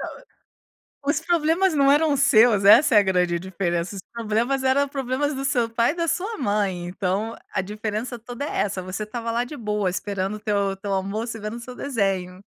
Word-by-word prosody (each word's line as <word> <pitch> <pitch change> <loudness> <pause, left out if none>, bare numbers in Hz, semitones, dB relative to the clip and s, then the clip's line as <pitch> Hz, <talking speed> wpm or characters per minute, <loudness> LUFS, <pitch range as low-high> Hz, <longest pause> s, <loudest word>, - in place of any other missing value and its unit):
Não, - - -7 0.9
os 290 - +2
problemas 335 +2 +2
não 280 -2 +4
eram 295 0 +3
seus, 235 -6 +5
essa 245 +8 +7
é - - +9
a - - +5
grande 180 -2 +1
diferença, 175 0 -2
os 195 - -6
problemas, 235 +4 -1
eram 270 +2 +3
problemas 270 +1 -2
do 270 0 -4
seu 250 -4 +1
pai 230 +2 +2
e - - -8
da 335 -1 -1
sua 400 +7 -2
mãe, 205 -6 -1
então 190 +5 -2 0.2
a - - 0
diferença 215 +4 -4
toda 245 +4 -6
é - - -4
essa. 195 -2 -2
Você 185 +3 -4
estava 230 +2 -4
lá, 235 +1 0
de 290 +4 -8
boa 210 -4 -1
esperando 195 +2 -3
o - - -8
teu 200 -2 0
teu 200 0 -4
almoço, 210 +5 -2
e - - -10
vendo 215 +2 -5
o - - -8
seu 250 +1 -9
desenho. 195 -9 -2
220 Hz, 205 wpm, -23 LUFS, 195-270 Hz, 0.9 s, é